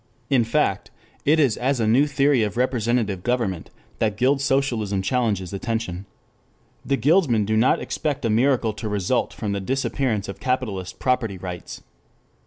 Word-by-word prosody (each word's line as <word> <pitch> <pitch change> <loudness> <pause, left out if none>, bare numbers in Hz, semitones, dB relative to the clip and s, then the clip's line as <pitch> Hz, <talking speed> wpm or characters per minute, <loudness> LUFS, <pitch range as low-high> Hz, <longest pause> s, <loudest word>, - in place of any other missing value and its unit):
In 130 -4 +4
fact, 115 - 0 0.4
it 155 +3 +4
is 135 -7 +3
as 130 +1 0
a 115 - +1
new 125 +7 +4
theory 140 -2 +2
of 105 +1 -2
representative 120 -5 0
government 110 -7 -1 0.3
that 105 -2 0
guild 135 +4 +2
socialism 120 -8 0
challenges 105 -6 -1
attention. 100 -3 -3 0.8
The 140 - 0
guildsmen 135 - +3
do 110 +2 0
not 115 +4 +3
expect 145 -4 -3
a - - +1
miracle 120 -1 +2
to 110 0 -5
result 105 +4 0
from 105 -3 -4
the 100 -1 -2
disappearance 130 -2 -1
of 100 - -7
capitalist 110 -8 -2
property 125 -6 0
rights. 90 -1 -7
115 Hz, 155 wpm, -23 LUFS, 105-135 Hz, 0.8 s, In